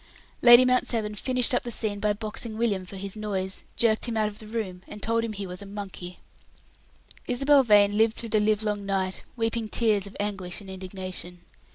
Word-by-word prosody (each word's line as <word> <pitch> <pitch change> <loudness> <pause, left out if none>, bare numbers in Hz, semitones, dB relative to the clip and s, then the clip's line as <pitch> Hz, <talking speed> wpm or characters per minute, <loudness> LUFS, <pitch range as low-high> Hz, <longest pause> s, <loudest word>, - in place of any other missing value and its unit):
Lady 240 +1 +9
Mount 255 0 +2
Severn 215 -3 -1
finished 250 +4 0
up 245 - +2
the 240 - -6
scene 215 -3 -2
by 210 +1 +1
boxing 215 +1 -4
William 205 -5 0
for 195 - -9
his 195 +1 -5
noise, 195 -3 -3
jerked 225 0 +2
him 230 -1 -2
out 215 -1 +2
of 210 - -13
the 215 - -9
room, 210 -5 -4
and 210 - -9
told 230 +1 +1
him 230 - -2
he 200 -1 -5
was 180 0 -7
a - - -8
monkey. 195 -3 -7 1.1
Isabel 275 +3 +5
Vane 205 -4 +5
lived 220 +1 +3
through 230 - -5
the 215 0 +3
livelong 210 -1 0
night, 190 -1 -1
weeping 225 -1 -1
tears 215 -3 +1
of 200 - -12
anguish 195 -3 -3
and 195 -2 -10
indignation. 185 -1 -6
210 Hz, 200 wpm, -26 LUFS, 195-230 Hz, 1.1 s, Lady